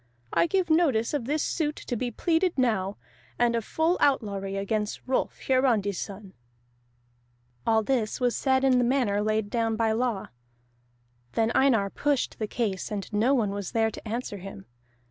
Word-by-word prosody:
I - - +3
give 365 -1 0
notice 285 -9 +3
of 285 -6 -1
this 300 +4 0
suit 305 -3 -1
to 245 - -5
be 245 +2 -2
pleaded 335 - 0
now, 210 -6 +1 0.4
and 240 -1 +2
of 230 - -1
full 320 - +1
outlawry 200 -9 +1
against 210 +1 -2
Rolf 260 0 -1
Hiarandi's 235 -7 +2
son." 195 -1 -7 1.3
All 220 -1 +3
that 225 -3 0
was 245 -2 +1
said 265 -1 +2
in 260 -2 +4
the - - +3
manner 240 -5 +1
laid 215 -1 0
down 225 -2 0
by 225 0 +1
law. 230 -3 -1 1.0
Then 225 0 +1
Einar 225 -8 +3
pushed 285 -3 -1
the 215 - -1
case, 205 -5 -2
and 205 0 -5
no 235 +7 +3
one 215 -6 +1
was 200 -2 -5
there 225 -1 +2
to 220 - -10
answer 225 -2 -4
him. 185 - -9
230 Hz, 165 wpm, -27 LUFS, 210-265 Hz, 1.3 s, in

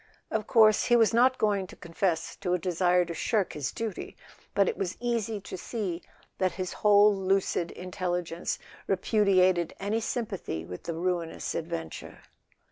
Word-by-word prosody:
Of 220 -1 -1
course 215 -2 +5
he 240 - +4
was 230 -1 +4
not 255 +2 +4
going 200 -3 +1
to - - -12
confess 165 -1 -2
to 180 -1 0
a - - +1
desire 180 0 +2
to 170 - -5
shirk 200 +2 0
his 145 -3 -3
duty; 225 -4 -5 0.4
but 200 -2 +4
it - - 0
was 185 -2 -3
easy 230 -3 -1
to - - -7
see 185 -3 -4 0.4
that 185 -2 +1
his 185 -2 -4
whole 205 0 +5
lucid 190 -3 0
intelligence 180 -2 -3 0.3
repudiated 185 -4 +2
any 205 +3 0
sympathy 205 - -3
with 90 +1 -9
the 170 - -3
ruinous 170 -1 -2
adventure. 80 - -6
185 Hz, 155 wpm, -28 LUFS, 175-210 Hz, 0.4 s, course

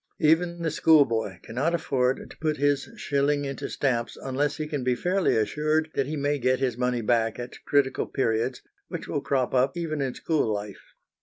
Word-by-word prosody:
Even 170 +2 +2
the 160 - 0
schoolboy 140 -9 +3
cannot 140 +9 0
afford 130 -5 0
to - - -14
put 155 -1 -1
his 145 -1 +1
shilling 145 0 0
into 135 -2 -4
stamps 120 -4 -1
unless 140 +2 -1
he 155 - -2
can 150 -4 -3
be 125 0 +2
fairly 180 +1 +1
assured 155 +7 0
that 135 - 0
he 155 - -3
may 145 0 0
get 130 +1 +2
his 130 -3 0
money 125 -1 0
back 115 0 +1
at 120 0 -8
critical 140 -2 +1
periods, 120 0 -1 0.2
which - - -6
will - - -2
crop 130 -3 0
up 130 +6 +2
even 155 -3 -2
in 130 -2 -2
school 155 -9 0
life. 105 -1 -6
140 Hz, 185 wpm, -26 LUFS, 125-155 Hz, 0.2 s, schoolboy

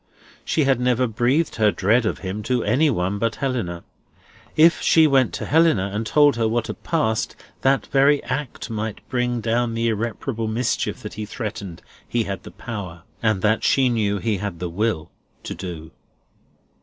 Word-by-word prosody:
She 155 - +1
had 135 -2 +2
never 125 0 +2
breathed 125 +8 0
her 110 -2 +4
dread 110 +4 +2
of - - -1
him 95 +3 -3
to 125 -2 +1
any 135 +9 +3
one 100 -4 -1
but 115 +1 0
Helena. 115 -11 -3 0.7
If 165 +2 +5
she 160 -1 +5
went 135 -5 +3
to - - -4
Helena, 150 - +3
and 110 +2 -2
told 145 -1 +4
her 115 -1 +2
what 115 +1 0
had - - -7
passed, 150 -10 0 0.3
that 135 +1 +2
very 140 +1 +3
act 135 -4 -4
might 110 -1 -4
bring 125 -1 0
down 115 +1 0
the 115 0 +1
irreparable 115 +1 -2
mischief 115 +3 -1
that - - -6
he 105 - -5
threatened 100 -6 -6 0.3
he 120 -1 +1
had 100 -3 -5
the - - -10
power, 95 -8 -7 0.2
and 110 -4 +1
that 110 +1 +2
she 130 -2 +3
knew 105 -4 0
he 110 0 -1
had 100 -2 -4
the 90 +1 -4
will, 90 -3 -1 0.3
to - - -5
do. 80 -3 -7
115 Hz, 180 wpm, -22 LUFS, 105-130 Hz, 0.7 s, If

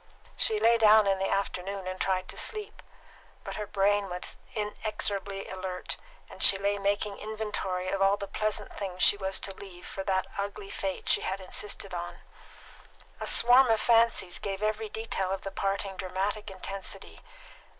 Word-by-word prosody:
She 435 -2 +2
lay 235 - +5
down 215 -1 +7
in 195 -1 +2
the 195 - 0
afternoon 195 0 -2
and 185 0 -5
tried 185 -1 0
to - - -4
sleep; 425 -2 -2 0.6
but - - -6
her 210 -1 -4
brain 200 0 +2
was 180 0 -6 0.2
inexorably 205 -2 -2
alert, 185 -1 -4 0.3
and - - -9
she 195 - +7
lay 200 +1 0
making 200 +1 -1
inventory 210 -4 -3
of 195 0 -1
all 195 +1 +4
the 200 - -4
pleasant 215 +1 -2
things 185 -2 -2
she - - +7
was 190 -1 -1
to 195 - -2
leave 185 -2 -11
for 195 - -5
that 190 -1 +1
ugly 200 0 -4
fate 190 -1 -4
she - - +4
had 190 +1 -2
insisted 195 0 -3
on. 175 0 -4 1.0
A - - -4
swarm 250 +2 +7
of 225 -2 +3
fancies 230 -6 +3
gave 195 0 -4
every 215 0 -1
detail 215 -3 -2
of 195 0 -2
the 195 - -5
parting 195 0 -2
dramatic 195 +3 -2
intensity. 195 0 -6
195 Hz, 170 wpm, -29 LUFS, 190-210 Hz, 1.0 s, down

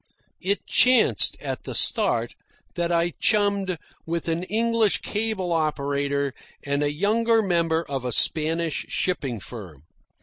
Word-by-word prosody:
It 200 +2 -1
chanced, 250 0 +3
at - - -4
the - - -5
start, - - +2 0.4
that 175 -1 -1
I 170 0 +1
chummed 200 -4 +1 0.3
with 170 +1 -4
an 165 +1 -1
English 225 0 +1
cable 210 -4 -2
operator 140 -3 -1 0.3
and 140 0 -1
a 145 0 +1
younger 220 +7 +2
member 170 -3 +1
of 135 -2 -3
a 125 - -2
Spanish 160 +5 +1
shipping 140 - -2
firm. 90 - -10
170 Hz, 130 wpm, -24 LUFS, 145-200 Hz, 0.4 s, chanced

